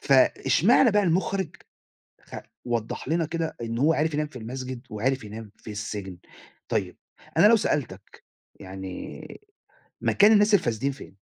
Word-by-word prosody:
فاشمعنى 145 - +4
بقى 205 0 +3
المُخرِج 185 0 0 0.6
خ - - -11 0.3
وضّح 120 0 -3
لنا 165 +1 +1
كده 165 0 -3
إن 115 0 -3
هو 150 +5 +4
عرِف 155 0 0
ينام 150 0 0
في 150 -4 -15
المسجد، 130 +2 -6
وعرِف 130 +4 -1
ينام 105 0 -9
في 110 - -11
السجن، 100 -3 -6 0.5
طيب - - -2 0.4
أنا - - +7
لو 230 +2 +7
سألتك، 115 - -3 0.4
يعني 95 - -8 0.6
مكان 210 +1 +5
الناس 210 0 +5
الفاسدين 135 - +2
فين؟ 130 - -12
135 Hz, 140 wpm, -26 LUFS, 110-165 Hz, 0.6 s, أنا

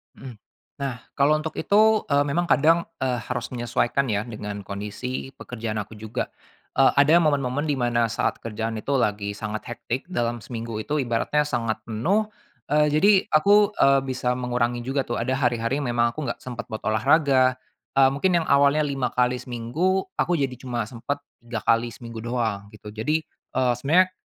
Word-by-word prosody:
Mhm. 130 -4 -10 0.4
Nah 135 -3 -3 0.2
kalau 150 +2 +3
untuk 160 0 -6
itu, 215 +1 +4
eee, 140 0 +3
memang 160 +5 0
kadang, 165 +2 +4 0.2
eee, 125 -2 0
harus 120 0 -3
menyesuaikan 120 +2 0
ya 105 -2 0
dengan 105 -3 -6
kondisi 105 +7 -5
pekerjaan 110 -3 -4
aku 105 +1 -10
juga. 110 +3 -4 0.5
Eee, 135 - +6
ada 145 +4 +5
momen-momen 145 -3 +1
di 150 - +1
mana 120 -2 +1
saat 110 - -1
kerjaan 115 0 -4
itu 140 +6 -2
lagi 105 -4 0
sangat 110 +1 -5
hectic 120 +3 -4
dalam 120 -9 -1
seminggu 115 -1 -6
itu 145 +7 -1
ibaratnya 120 +4 +1
sangat 115 -6 -2
penuh, 175 - 0 0.4
eee, 150 0 +4
jadi 195 +8 +5 0.2
aku, 205 +6 +5
eee, 135 -5 +4
bisa 125 -1 -1
mengurangi 120 -1 -1
juga 135 +1 0
tuh, 120 -2 -3
ada 130 +3 -1
hari-hari 120 +1 0
yang 125 - -2
memang 120 0 +1
aku 140 -1 -4
enggak - - -3
sempat 125 -1 -6
buat 110 - -6
olahraga, 130 +3 +3 0.4
eee, 135 -1 +7
mungkin 175 +5 +2
yang 165 - -1
awalnya 140 +2 +4
5 135 -3 -1
kali 125 +1 +1
seminggu, 145 +11 -1
aku 175 -1 +1
jadi 135 -2 -1
cuma 120 -4 -2
sempat 120 +4 -4 0.2
3 120 -2 -6
kali 115 +1 +3
seminggu 115 0 -9
doang 110 -4 -2
gitu. 105 -1 -11
Jadi, 150 +8 -1
eee, 125 -1 -2
sebenernya, 170 +9 +3
125 Hz, 175 wpm, -24 LUFS, 115-145 Hz, 0.5 s, eee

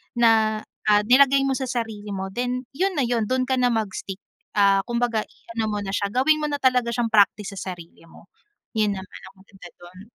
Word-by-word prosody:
na, 220 -2 +3 0.3
ah, 210 -1 +5
nilagay 275 +3 +5
mo 270 - +1
sa 265 - -3
sarili 225 -4 -4
mo, 190 0 -4
then 250 +3 -2
‘yon 385 +3 +1
na - - +2
yun. 235 -2 0
Do’n 255 +1 0
ka 260 - +2
na 245 - +3
mag-stick. 195 -3 -4 0.4
Ah, 200 -1 +4
kumbaga 235 -2 0
i - - -27 0.2
ano 225 - +1
mo 210 - -2
na 195 - -5
siya, 200 0 -1
gawin 285 +5 +3
mo - - +1
na 285 - -2
talaga 250 -2 +2
siyang 235 -1 -1
practice 205 -1 +3
sa 185 0 -4
sarili 170 -1 -15
mo. 170 - -17 0.5
Yun 210 -2 +2
naman 190 0 -9
ang - - -39
maganda 195 -2 -14
do’n. 180 +1 -13
220 Hz, 215 wpm, -23 LUFS, 200-250 Hz, 0.5 s, ah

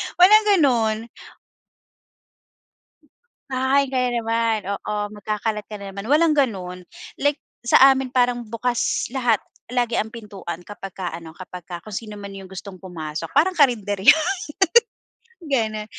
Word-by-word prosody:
Walang 425 +4 +7
ganon. 235 - +2 2.5
"Kakain 265 +1 +2
ka 260 - +1
na 250 0 +1
naman," 230 0 +1 0.2
oo. 210 - -4 0.2
"Magkakalat 210 0 -3
ka 215 - -7
na 200 -1 -7
naman." 200 +2 -7
Walang 310 +3 +4
ganun 185 -8 -1 0.3
like 285 0 +1 0.2
sa 235 - +5 0.2
amin 265 -1 -3
parang 245 -1 +1
bukas 235 +2 -1
lahat 245 -5 +2 0.3
lagi 240 -2 0
ang 220 +1 -1
pintuan 200 -7 -7
kapagka 195 -2 -7
ano, 165 -1 -10
kapagka 180 0 -9
kung 205 +2 -9
sino 210 -1 -6
man 200 -1 -8
yung 195 -1 -10
gustong 190 0 -8
pumasok, 160 -5 -6
parang 345 +7 +3
karinderya. 210 - +4 1.3
Ganon. 220 -7 -1
220 Hz, 130 wpm, -22 LUFS, 195-255 Hz, 2.5 s, Walang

